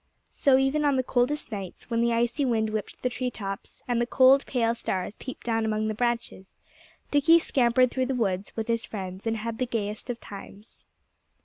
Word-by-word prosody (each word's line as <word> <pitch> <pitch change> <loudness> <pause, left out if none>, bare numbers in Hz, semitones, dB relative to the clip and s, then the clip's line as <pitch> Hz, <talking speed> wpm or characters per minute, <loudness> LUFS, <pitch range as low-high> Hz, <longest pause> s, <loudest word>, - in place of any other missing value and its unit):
So 270 -2 +4
even 270 +3 +2
on 285 -2 +3
the 260 - +1
coldest 255 +3 0
nights, 195 +2 -7
when 230 0 +2
the 235 0 +2
icy 240 +5 +1
wind 220 -4 +1
whipped 215 -1 -4
the 250 - +2
tree 250 +1 -2
tops, 195 -4 -7
and 240 -1 +1
the 240 - 0
cold, 265 +2 +5
pale 230 -3 +1
stars 195 -3 -3
peeped 260 - -9
down 225 -1 +1
among 215 0 0
the - - -1
branches, 235 -4 -2 0.6
Dickie 295 +4 +6
scampered 255 -5 +3
through 260 -1 0
the 265 - -1
woods 195 -5 -1
with 225 -1 -3
his 230 -1 0
friends 190 0 -6
and 225 0 0
had 225 +1 -4
the 255 - 0
gayest 215 0 -3
of 240 -1 -3
times. 200 +1 -12
235 Hz, 200 wpm, -27 LUFS, 215-255 Hz, 0.6 s, Dickie